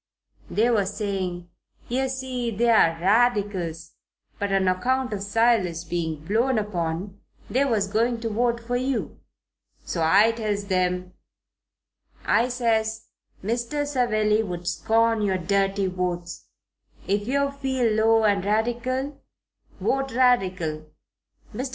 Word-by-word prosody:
They 230 Hz, +3 st, +2 dB
was 205 Hz, -2 st, 0 dB
saying, 185 Hz, -4 st, -3 dB, 0.4 s
yer 265 Hz, +2 st, 0 dB
see, 260 Hz, -2 st, -3 dB
they 230 Hz, +2 st, 0 dB
was 165 Hz, -6 st, +3 dB
Radicals, 195 Hz, -6 st, +1 dB, 0.5 s
but 200 Hz, -1 st, -1 dB
on 195 Hz, -1 st, +2 dB
account 250 Hz, +7 st, 0 dB
of 200 Hz, -, -3 dB
Silas 200 Hz, -5 st, +1 dB
being 160 Hz, -3 st, -3 dB
blown 230 Hz, +6 st, +1 dB
upon, 190 Hz, -1 st, -3 dB, 0.3 s
they 270 Hz, +3 st, +2 dB
was 220 Hz, -7 st, +1 dB
going 230 Hz, +3 st, 0 dB
to 230 Hz, -, -2 dB
vote 235 Hz, +2 st, 0 dB
for 240 Hz, +1 st, -4 dB
you. 255 Hz, +1 st, -2 dB, 0.7 s
So 170 Hz, -, -3 dB
I 200 Hz, +8 st, +5 dB
tells 210 Hz, -3 st, -3 dB
'em, 180 Hz, 0 st, 0 dB, 1.1 s
I 240 Hz, +2 st, +3 dB
says, 225 Hz, -2 st, -1 dB, 0.3 s
'Mr. 240 Hz, +7 st, -1 dB
Savelli 220 Hz, -6 st, +1 dB
would 175 Hz, -4 st, -5 dB
scorn 225 Hz, +2 st, +2 dB
your 195 Hz, -2 st, +1 dB
dirty 195 Hz, +2 st, 0 dB
votes. 180 Hz, -2 st, -3 dB, 0.6 s
If 205 Hz, +1 st, 0 dB
yer 280 Hz, +2 st, +1 dB
feel 265 Hz, -5 st, 0 dB
low 225 Hz, +1 st, +3 dB
and 200 Hz, -3 st, +2 dB
Radical, 240 Hz, +6 st, -1 dB, 0.6 s
vote 270 Hz, -1 st, -1 dB
Radical. 185 Hz, -11 st, +1 dB, 0.7 s
Mr. 260 Hz, +1 st, -3 dB
215 Hz, 125 wpm, -24 LUFS, 185-240 Hz, 1.1 s, I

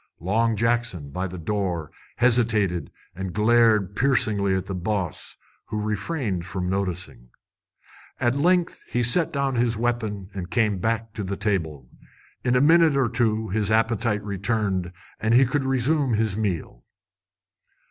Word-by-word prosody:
Long 110 Hz, +6 st, +1 dB
Jackson, 115 Hz, -10 st, -1 dB
by 90 Hz, +6 st, -3 dB
the 90 Hz, 0 st, -8 dB
door, 90 Hz, -3 st, -2 dB, 0.2 s
hesitated 110 Hz, -, +2 dB, 0.2 s
and 95 Hz, 0 st, -5 dB
glared 110 Hz, -3 st, +3 dB
piercingly 105 Hz, -7 st, +2 dB
at 95 Hz, -, -2 dB
the 95 Hz, -, -5 dB
boss, 90 Hz, -2 st, -3 dB, 0.3 s
who 105 Hz, -, -3 dB
refrained 105 Hz, -, -2 dB
from 90 Hz, 0 st, -4 dB
noticing. 90 Hz, -9 st, -4 dB, 0.9 s
At 120 Hz, 0 st, +2 dB
length 175 Hz, +5 st, +1 dB
he 125 Hz, -, 0 dB
set 155 Hz, +8 st, +3 dB
down 140 Hz, -1 st, -1 dB
his 120 Hz, -2 st, +1 dB
weapon 110 Hz, -5 st, -2 dB
and 90 Hz, -3 st, -6 dB
came 105 Hz, -4 st, +1 dB
back 115 Hz, +2 st, -2 dB
to 105 Hz, -, -4 dB
the 100 Hz, +1 st, -4 dB
table. 80 Hz, -, -2 dB, 0.6 s
In 125 Hz, 0 st, +2 dB
a 125 Hz, -, +4 dB
minute 160 Hz, -1 st, +5 dB
or 130 Hz, -4 st, +2 dB
two 110 Hz, -2 st, 0 dB
his 105 Hz, +1 st, 0 dB
appetite 110 Hz, -1 st, +1 dB
returned, 100 Hz, -2 st, -1 dB, 0.3 s
and 110 Hz, +3 st, +2 dB
he 130 Hz, +2 st, +6 dB
could 135 Hz, +3 st, -1 dB
resume 135 Hz, +1 st, +1 dB
his 110 Hz, -2 st, 0 dB
meal. 95 Hz, -, -3 dB
110 Hz, 145 wpm, -24 LUFS, 95-120 Hz, 0.9 s, he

